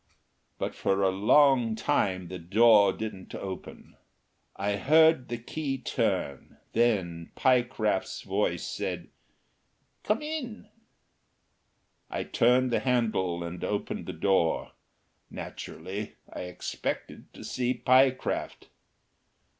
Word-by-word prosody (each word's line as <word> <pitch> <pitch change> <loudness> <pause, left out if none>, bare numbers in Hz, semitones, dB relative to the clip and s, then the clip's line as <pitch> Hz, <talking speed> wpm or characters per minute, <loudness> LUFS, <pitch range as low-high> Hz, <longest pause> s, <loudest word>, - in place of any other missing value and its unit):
But - - -3
for 100 0 0
a 95 - +3
long 120 +3 +4
time 95 -5 0
the 90 0 -6
door 100 +3 +5
didn't 105 -4 -7
open. 95 -1 -8 0.6
I 100 +1 -1
heard 160 +1 +4
the 120 - -2
key 135 +3 -4
turn. 70 - -2 0.2
Then 95 -8 +1
Pyecraft's 120 -6 +1
voice 95 -3 -1
said, - - -4 0.9
"Come 215 +7 0
in." 260 -9 -5 1.4
I - - -3
turned 125 +2 +3
the - - +2
handle 110 -9 0
and 85 +1 -6
opened 105 -1 -3
the - - -4
door. 95 -4 +1 0.6
Naturally 95 +6 -7 0.2
I - - -5
expected 90 - -5
to - - -10
see 125 0 -1
Pyecraft. 130 +1 +1
110 Hz, 105 wpm, -28 LUFS, 95-130 Hz, 1.4 s, door